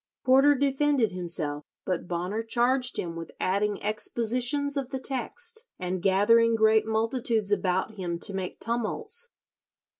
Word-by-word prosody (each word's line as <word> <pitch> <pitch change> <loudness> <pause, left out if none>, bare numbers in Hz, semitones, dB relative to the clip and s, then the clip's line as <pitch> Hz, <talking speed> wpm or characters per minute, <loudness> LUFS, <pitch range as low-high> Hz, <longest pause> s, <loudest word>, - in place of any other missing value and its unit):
Porter 270 +3 +6
defended 275 -3 +2
himself, 165 -5 -4 0.2
but 180 -2 -2
Bonner 180 +5 -2
charged 245 +2 +1
him 170 -1 -3
with 165 -1 -7
adding 200 +2 0
expositions 245 +6 0
of 275 -3 -2
the 265 - -3
text, 365 - -3
and 180 0 -3
gathering 225 +5 +4
"great 220 0 +4
multitudes 225 -1 0
about 190 0 +1
him 175 -3 -3
to 200 +4 -1
make 190 -1 -4
tumults." 435 - -2
225 Hz, 130 wpm, -27 LUFS, 190-260 Hz, 0.2 s, Porter